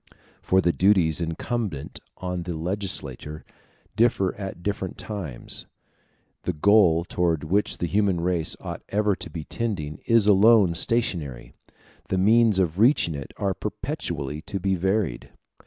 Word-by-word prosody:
For 95 0 +2
the 85 - +2
duties 90 -4 +3
incumbent 85 - -4 0.2
on 90 -1 -4
the 85 -1 -5
legislator 80 -5 -4 0.5
differ 110 -5 +2
at 95 -4 -7
different 95 -2 -3
times; 95 - -5 0.7
the 90 - -2
goal 85 -1 +4
towards 85 -4 -1
which 100 +6 0
the - - -2
human 100 0 +1
race 85 -2 0
ought - - -7
ever 105 -1 +1
to - - -8
be 80 -2 -6
tending 75 -9 -4
is 115 -3 +4
alone 105 -2 +5
stationary; 85 - +2 0.6
the 95 - 0
means 110 +2 +4
of 90 -1 0
reaching 115 - +4
it 70 -2 -7
are 100 -2 -1
perpetually 85 - -5
to 100 - -3
be 95 +1 0
varied. 95 - -1
95 Hz, 140 wpm, -24 LUFS, 80-105 Hz, 0.7 s, alone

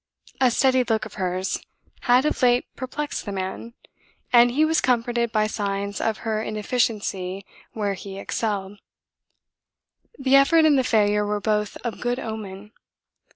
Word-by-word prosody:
A 255 - +6
steady 260 +1 +3
look 225 -2 0
of - - -10
hers 185 +1 -1 0.4
had 250 +3 +3
of 300 - -1
late 245 -1 +4
perplexed 290 +3 -4
the 205 - -5
man, 195 +5 -5 0.6
and 240 0 +7
he 290 +6 +2
was 320 0 +2
comforted 235 -1 +1
by 215 -1 +2
signs 200 -2 -3
of 220 -1 0
her 215 -1 0
inefficiency 210 -4 -2 0.3
where 205 -2 -1
he 195 +1 -8
excelled. 200 -1 -3 1.4
The 270 -1 +3
effort 315 +4 +5
and 305 -2 +5
the - - +2
failure 210 -3 +2
were 210 0 -1
both 210 0 -1
of 235 -2 -4
good 245 0 -1
omen. 210 -4 -7
220 Hz, 150 wpm, -24 LUFS, 205-250 Hz, 1.4 s, and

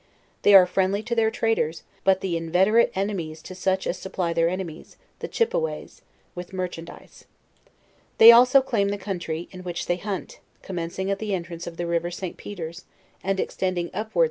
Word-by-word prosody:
They 205 - +6
are 185 -2 +9
friendly 190 +3 0
to 240 - -3
their, 225 -1 +3
traders; 220 -9 -1 0.2
but 190 -1 +3
the 185 -3 -1
inveterate 185 +8 +3
enemies 185 -5 -3
to 185 - -9
such 190 +1 -1
as 185 - -2
supply 180 -3 -2
their 165 0 +2
enBmies, 175 -3 -5 0.2
the - - -5
Chippeways, 475 +1 -2 0.3
with 180 +1 -8
merchandise. 180 -3 -7 0.9
They 225 +1 +11
also 250 +3 +6
claim 210 -6 0
the 205 - -2
country 175 -4 -4
in 185 - -9
which 175 -1 -4
they 175 - 0
hunt, 195 0 -5 0.2
commencing 185 +1 -3
at 200 - -1
the 210 -3 -1
entrance 170 -1 -6
of 170 -1 -8
the 175 - -2
river 170 0 -1
St. 175 0 -6
Pe 205 - -9
ters, 170 0 -7 0.4
and 195 0 -1
extending 185 -3 -2
apwards. 215 - -4
185 Hz, 175 wpm, -24 LUFS, 170-205 Hz, 0.9 s, They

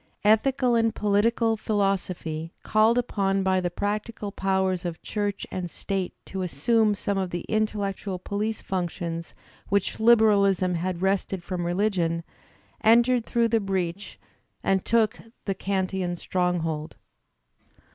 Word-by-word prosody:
Ethical 245 +4 +3
and 225 -1 +2
political 225 +2 +2
philosophy, 185 -6 -1
called 220 +2 +3
upon 195 -5 +1
by 190 -1 +2
the 175 - -1
practical 205 +3 -3
powers 190 -2 0
of 170 -2 -4
Church 205 -2 -2
and 180 -2 -3
State 190 +1 -3
to 190 - -5
assume 210 - +2
some 200 0 -1
of 190 -1 -1
the 175 0 -3
intellectual 205 -2 -2
poUce 210 +4 -3
functions 170 -2 -3 0.3
which 200 -1 +1
UberaUsm 205 -5 +4
had 175 +1 -2
wrested 190 -1 0
from 175 -1 -3
religion, 175 -3 0 0.6
entered 235 +2 +4
through 235 -1 +2
the 225 0 +3
breach 190 -1 -3 0.4
and 190 -1 +2
took 230 -2 +2 0.3
the 195 - 0
Kantian 190 -2 -1
stronghold. 170 -4 -1
195 Hz, 125 wpm, -26 LUFS, 180-215 Hz, 0.6 s, UberaUsm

